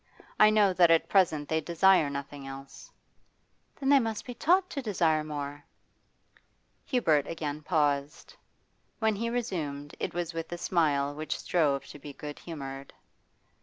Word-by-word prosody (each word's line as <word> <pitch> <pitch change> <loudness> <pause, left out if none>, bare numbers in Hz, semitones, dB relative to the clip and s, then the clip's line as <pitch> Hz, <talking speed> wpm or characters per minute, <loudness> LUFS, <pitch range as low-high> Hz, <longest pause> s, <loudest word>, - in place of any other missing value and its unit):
I 215 - +8
know 210 -3 +4
that 175 -2 +5
at 165 -1 +4
present 160 -7 +2
they 160 0 0
desire 170 -1 +4
nothing 140 0 -6
else.' 135 0 -10 0.9
'Then 270 -1 -2
they 280 -1 +7
must 225 -3 -3
be 245 - -6
taught 360 +9 +2
to 280 - -3
desire 170 -9 +1
more.' 145 -1 -6 1.2
Hubert 160 - +2
again 155 -2 -4
paused. 145 -2 -1 0.6
When 220 -2 +1
he 230 +3 -2
resumed 155 -12 -3
it - - -3
was 175 -1 -3
with 165 0 -5
a 175 - -4
smile 145 -6 +1
which 155 +1 -4
strove 145 -6 0
to 145 - -11
be 145 0 -9
good 145 +1 -8
humoured. 135 -4 -8
160 Hz, 150 wpm, -29 LUFS, 145-195 Hz, 1.2 s, I